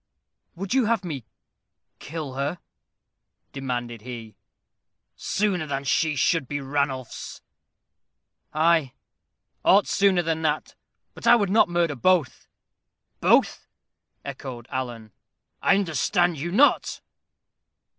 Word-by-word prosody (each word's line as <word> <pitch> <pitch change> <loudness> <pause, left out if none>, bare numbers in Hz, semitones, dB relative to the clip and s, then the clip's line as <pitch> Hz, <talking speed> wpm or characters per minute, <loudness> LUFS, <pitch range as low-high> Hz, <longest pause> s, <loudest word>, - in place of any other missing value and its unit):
"Would 190 +4 -4
you 260 -3 +3
have 225 -2 +1
me 140 -9 -5 0.7
kill 150 -3 -6
her?" 140 +6 -2 0.9
demanded 120 -4 -4
he. 115 -3 -8 0.8
"Sooner 190 -6 -1
than 140 -1 -3
she 150 +3 +1
should 150 -1 +1
be 145 +2 -3
Ranulph's." 135 -2 -3 1.1
"Ay, 155 -4 +2 0.7
aught 200 +2 +5
sooner 195 -3 +3
than 160 -1 -1
that. 155 -1 -1 0.4
But - - -6
I - - +9
would 205 -5 +1
not 215 -3 +4
murder 170 -3 +1
both." 165 +2 +1 0.7
"Both!" - - +3 0.6
echoed 130 -4 -7
Alan. 120 -5 -5 0.5
"I 195 - +4
understand 175 -2 +1
you 170 +4 -3
not." 275 +10 +3
155 Hz, 105 wpm, -25 LUFS, 130-180 Hz, 1.1 s, I